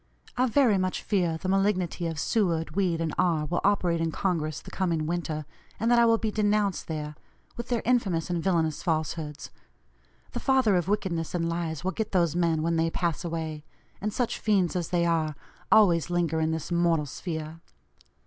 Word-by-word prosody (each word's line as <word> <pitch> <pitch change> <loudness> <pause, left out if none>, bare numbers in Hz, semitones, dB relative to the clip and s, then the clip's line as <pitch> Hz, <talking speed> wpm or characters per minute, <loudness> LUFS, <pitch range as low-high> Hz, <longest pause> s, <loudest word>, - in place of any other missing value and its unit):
I 255 +1 +2
very 235 -5 +3
much 185 0 -2
fear 175 -6 +1
the 185 - -5
malignity 185 -3 +1
of 165 -1 -4
Seward, 165 -3 0
Weed, 180 -4 +1
and 160 -2 -1
R. 165 -4 +2
will 175 +4 -1
operate 180 -4 +2
in 165 -1 0
Congress 160 -5 -1
the - - -12
coming 170 -5 0
winter, 160 -2 -3 0.3
and 230 +3 +1
that 240 - +6
I 235 - +5
will 230 0 +4
be 220 -1 -2
denounced 205 -2 +1
there, 150 -2 -4 0.4
with 235 - -6
their 240 -2 -1
infamous 200 -10 +1
and 175 -2 -2
villanous 165 -5 +1
falsehoods. 155 -3 -3 0.8
The - - -4
father 260 -7 +3
of 175 -1 0
wickedness 180 -6 -1
and 165 -1 0
lies 165 -2 -3
will 190 - 0
get 220 +1 -4
those 170 -4 +2
men 165 -3 +1
when 165 0 +1
they 165 0 +2
'pass 170 -1 -2
away;' 160 -3 -4 0.4
and 210 +2 -1
such 245 +2 -1
fiends 195 -5 +1
as 175 -3 -2
they 170 -1 +1
are, 160 -3 +1 0.4
always 175 -8 +5
linger 170 -2 0
in 160 0 +1
this 160 +1 -3
mortal 170 -3 +2
sphere. 160 +2 -6
170 Hz, 185 wpm, -27 LUFS, 160-195 Hz, 0.8 s, that